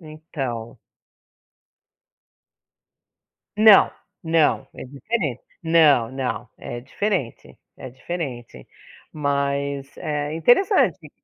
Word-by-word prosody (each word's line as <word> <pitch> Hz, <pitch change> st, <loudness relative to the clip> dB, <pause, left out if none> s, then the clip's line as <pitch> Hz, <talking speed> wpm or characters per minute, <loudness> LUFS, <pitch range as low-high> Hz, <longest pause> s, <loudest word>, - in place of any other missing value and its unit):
Então. 145 Hz, -8 st, -7 dB, 2.8 s
Não. 215 Hz, -1 st, +7 dB, 0.3 s
Não. 160 Hz, -2 st, +2 dB
É -, -, -8 dB
diferente. 140 Hz, -, -3 dB, 0.2 s
Não, 155 Hz, -8 st, +4 dB
não. 130 Hz, -2 st, -4 dB
É 120 Hz, -, -7 dB
diferente. 140 Hz, -, -4 dB, 0.2 s
É 130 Hz, -, -9 dB
diferente. 130 Hz, -3 st, -7 dB, 0.5 s
Mas, 140 Hz, -1 st, -2 dB
eh, 150 Hz, 0 st, -3 dB
interessante. 230 Hz, -, +2 dB
145 Hz, 75 wpm, -22 LUFS, 130-165 Hz, 2.8 s, Não